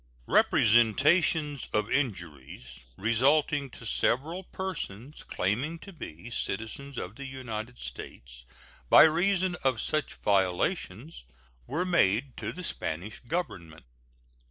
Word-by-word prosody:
Representations 145 Hz, -, +3 dB
of 105 Hz, 0 st, 0 dB
injuries 75 Hz, -, -3 dB
resulting 140 Hz, +6 st, +2 dB
to 120 Hz, -, -11 dB
several 145 Hz, -, 0 dB
persons 150 Hz, -, -6 dB
claiming 125 Hz, -, -1 dB
to 195 Hz, +4 st, -12 dB
be 120 Hz, -, -9 dB
citizens 115 Hz, +6 st, -4 dB
of -, -, -5 dB
the 140 Hz, -, -8 dB
United 125 Hz, -3 st, -6 dB
States -, -, -8 dB, 0.5 s
by -, -, +10 dB
reason 180 Hz, +3 st, +2 dB
of 130 Hz, -4 st, +2 dB
such 155 Hz, +2 st, -1 dB
violations 100 Hz, -, -1 dB, 0.4 s
were 175 Hz, +4 st, -1 dB
made 130 Hz, -, +2 dB
to 110 Hz, 0 st, -3 dB
the 180 Hz, -, -8 dB
Spanish 95 Hz, -, -4 dB
Government. 85 Hz, -, -4 dB
125 Hz, 110 wpm, -29 LUFS, 100-155 Hz, 0.5 s, by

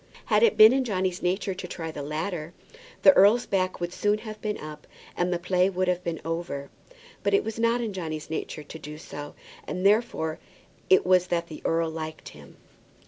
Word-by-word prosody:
Had -, -, +3 dB
it 465 Hz, -, +4 dB
been 215 Hz, +3 st, +9 dB
in 265 Hz, 0 st, +2 dB
Johnny's 185 Hz, -5 st, -1 dB
nature 190 Hz, +2 st, 0 dB
to 185 Hz, 0 st, -7 dB
try 165 Hz, -2 st, -5 dB
the 150 Hz, -, -6 dB
latter, 155 Hz, +3 st, -4 dB, 0.5 s
the 190 Hz, -, +9 dB
earl's 210 Hz, +5 st, +5 dB
back 185 Hz, -1 st, -1 dB
would 175 Hz, 0 st, -3 dB
soon 205 Hz, +2 st, +1 dB
have 215 Hz, -1 st, -9 dB
been 210 Hz, -1 st, -2 dB
up -, -, -9 dB
at -, -, -6 dB
once, 150 Hz, 0 st, -13 dB, 0.3 s
and 175 Hz, +1 st, 0 dB
the 175 Hz, -, +1 dB
play 180 Hz, +1 st, +2 dB
would 185 Hz, -1 st, -1 dB
have 180 Hz, 0 st, 0 dB
been 170 Hz, -2 st, -3 dB
over. 165 Hz, -4 st, -4 dB, 0.5 s
But -, -, +2 dB
it 405 Hz, -, +2 dB
was 225 Hz, 0 st, -5 dB
not 230 Hz, +1 st, +2 dB
in 225 Hz, -3 st, -3 dB
Johnny's 155 Hz, -4 st, -5 dB
nature 155 Hz, -1 st, -5 dB
to 160 Hz, +2 st, -10 dB
do 150 Hz, 0 st, -8 dB
so, 145 Hz, -1 st, -9 dB, 0.3 s
and 180 Hz, +1 st, -3 dB
therefore 200 Hz, -7 st, +2 dB, 0.5 s
it 185 Hz, -, +5 dB
was 180 Hz, 0 st, +4 dB
that 170 Hz, -1 st, -1 dB
the 155 Hz, -, -9 dB
earl 165 Hz, 0 st, +1 dB
liked 160 Hz, -1 st, -6 dB
him. -, -, -15 dB
180 Hz, 210 wpm, -26 LUFS, 160-200 Hz, 0.5 s, been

